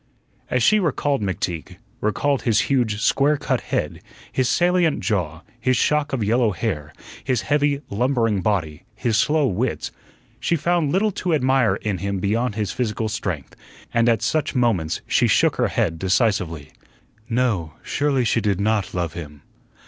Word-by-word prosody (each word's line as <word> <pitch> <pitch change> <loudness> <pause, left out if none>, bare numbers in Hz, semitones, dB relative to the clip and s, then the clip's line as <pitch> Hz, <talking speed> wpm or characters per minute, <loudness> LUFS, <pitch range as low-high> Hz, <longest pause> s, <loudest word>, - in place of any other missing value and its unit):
As 125 -2 +1
she 215 - +5
recalled 145 - 0
McTeague 90 -3 -3 0.2
recalled 135 +6 0
his 115 -2 +2
huge, 115 -6 0
square 145 +2 +3
cut - - -1
head, - - -3 0.3
his 130 -2 +1
salient 175 +1 +2
jaw, 85 -7 -1 0.2
his 130 +1 +1
shock 150 +2 +1
of 130 -5 -1
yellow 115 +2 +2
hair, 75 -9 -3 0.3
his 125 -4 0
heavy, 145 -1 +1
lumbering 115 -2 +1
body, 85 -6 -1
his 115 0 0
slow 150 +6 +3
wits 120 +2 -1 0.5
she 170 - +1
found 170 -1 +1
little 210 +5 +2
to 175 -3 0
admire 130 -4 +2
in 100 -4 -3
him 100 +1 -2
beyond 105 +4 0
his 105 -3 -2
physical 110 -2 -2
strength, 90 - -4 0.4
and 115 0 +3
at 115 -3 +1
such 155 -3 0
moments 110 -11 +1
she - - +2
shook - - +3
her - - +2
head 80 0 -1
decisively. 95 - 0 0.6
"No, 115 -10 0
surely 140 -4 0
she 115 - +1
did 100 -3 0
not 100 -2 0
love 85 -3 -2
him." 75 -4 -9
115 Hz, 155 wpm, -22 LUFS, 95-140 Hz, 0.6 s, she